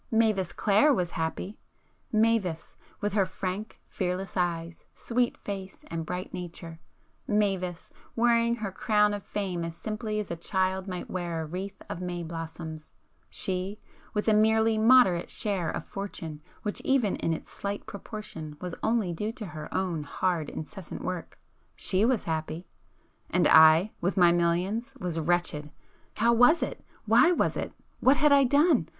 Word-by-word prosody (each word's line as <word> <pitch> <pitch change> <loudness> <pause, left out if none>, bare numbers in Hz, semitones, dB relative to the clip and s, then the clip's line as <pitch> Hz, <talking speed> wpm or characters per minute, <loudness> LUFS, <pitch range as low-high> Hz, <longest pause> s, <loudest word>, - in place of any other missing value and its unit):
Mavis 215 -6 +2
Clare 215 +9 +4
was 180 -9 0
happy!—Mavis, 195 +2 -2 0.3
with 205 -1 -1
her 200 -2 +3
frank 185 +3 -5
fearless 185 +1 -3
eyes, 170 -2 -2
sweet 245 0 0
face 195 -2 -7
and 165 -1 -3
bright 180 +1 -4
nature,—Mavis, 180 +2 -4 0.2
wearing 235 0 +3
her 215 -4 -4
crown 210 +2 +2
of 205 - -3
Fame 190 -4 -3
as 165 0 -5
simply 215 +2 -3
as 210 - -4
a - - -1
child 190 +2 -1
might 180 -2 -5
wear 175 -3 -3
a 160 - -3
wreath 185 +5 -6
of 180 - -5
may 175 -1 -3
blossom,—she, 165 +4 -6 0.3
with 210 +1 -2
a 220 - +5
merely 220 +1 +4
moderate 220 -7 +5
share 195 -5 -1
of - - -4
fortune 165 -6 -6 0.2
which 210 - -2
even 260 -7 +2
in 165 - -1
its 160 - -5
slight 200 0 -4
proportion 200 -8 -8
was 180 -2 -5
only 220 -6 +1
due 210 +6 -2
to 230 -3 -7
her 155 -4 -8
own 180 -4 -1
hard 160 +1 -1
incessant 185 +2 -7
work,—she 185 +2 -2
was 245 -3 +2
happy. 160 +2 -3 0.6
And 175 -4 +3
I,—with 165 +4 +5
my 175 -2 +7
millions,—was 180 +3 0
wretched! 160 -2 0 0.5
How 235 +1 +4
was 245 +8 +5
it? - - -5 0.2
Why 235 +9 +6
was 355 - +1
it? - - -3 0.3
What 265 +2 +5
had 300 -1 +4
I 280 -1 +6
done? 285 - +4
190 Hz, 145 wpm, -28 LUFS, 170-215 Hz, 0.6 s, my